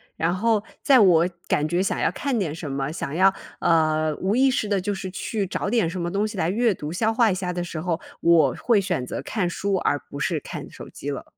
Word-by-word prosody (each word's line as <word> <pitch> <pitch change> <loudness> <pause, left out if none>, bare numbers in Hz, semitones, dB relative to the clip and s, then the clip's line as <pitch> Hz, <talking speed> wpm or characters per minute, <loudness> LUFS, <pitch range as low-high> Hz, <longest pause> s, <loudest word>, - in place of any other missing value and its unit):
然 165 +2 0
后 215 +2 +1 0.2
在 275 -2 +5
我 175 -3 +5 0.2
感 150 - +2
觉 175 +4 +1
想 - - -1
要 - - +2
看 270 -5 -2
点 160 -5 -2
什 155 -4 -6
么， 135 +1 -2
想 140 -4 -4
要， 190 +3 +4 0.3
呃， 155 -2 +2
无 200 +6 +1
意 270 +1 +5
识 220 -4 -1
地 200 -2 +2
就 205 +2 -2
是 190 -1 -6
去 205 +1 -3
找 190 - -3
点 220 -7 +2
什 180 +1 -5
么 170 0 -2
东 200 +3 0
西 215 -2 -5
来 165 0 +1
阅 230 +2 +2
读， 155 -2 -6
消 220 +4 +1
化 230 0 +4
一 190 - 0
下 180 -1 -3
的 175 0 -3
时 170 -2 -5
候， 175 -1 -1 0.2
我 160 -6 +4
会 230 -4 +4
选 180 -10 -2
择 - - -5
看 185 -6 -2
书， 200 +2 -1
而 145 -6 +1
不 140 - -7
是 160 +1 -1
看 - - -8
手 - - -10
机 - - -7
了。 - - -4
180 Hz, 270 characters per minute, -24 LUFS, 160-205 Hz, 0.3 s, 在